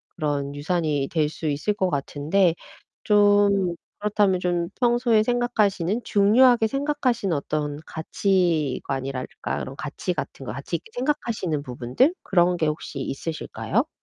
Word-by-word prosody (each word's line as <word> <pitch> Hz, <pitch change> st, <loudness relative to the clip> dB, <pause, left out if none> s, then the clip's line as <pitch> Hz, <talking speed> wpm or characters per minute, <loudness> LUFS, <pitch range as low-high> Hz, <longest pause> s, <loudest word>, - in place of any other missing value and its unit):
그런 145 Hz, -2 st, -2 dB
유산이 150 Hz, -2 st, -1 dB
될 155 Hz, -3 st, +2 dB
수 160 Hz, +1 st, -5 dB
있을 150 Hz, +9 st, 0 dB
것 190 Hz, -3 st, 0 dB
같은데. 155 Hz, +5 st, +1 dB, 0.5 s
좀 205 Hz, -3 st, +4 dB, 0.3 s
그렇다면 205 Hz, -3 st, +2 dB
좀 175 Hz, -1 st, -1 dB
평소에 240 Hz, -2 st, +3 dB
생각하시는, 220 Hz, -4 st, +1 dB
중요하게 225 Hz, +3 st, +5 dB
생각하시는 260 Hz, -, 0 dB
어떤 145 Hz, 0 st, -2 dB
가치관이랄까 150 Hz, -7 st, -1 dB
그런 135 Hz, -, -6 dB
가치 155 Hz, +4 st, -3 dB
같은 135 Hz, -, -6 dB
거, -, -, -4 dB
가치 140 Hz, +6 st, -4 dB
있게 175 Hz, -, -18 dB
생각하시는 235 Hz, -, -1 dB
부분들 125 Hz, -, +1 dB
그런 180 Hz, -2 st, +3 dB
게 160 Hz, -2 st, +1 dB
혹시 150 Hz, -2 st, -4 dB
있으실까요? 155 Hz, +4 st, -2 dB
180 Hz, 310 characters per minute, -24 LUFS, 150-210 Hz, 0.5 s, 중요하게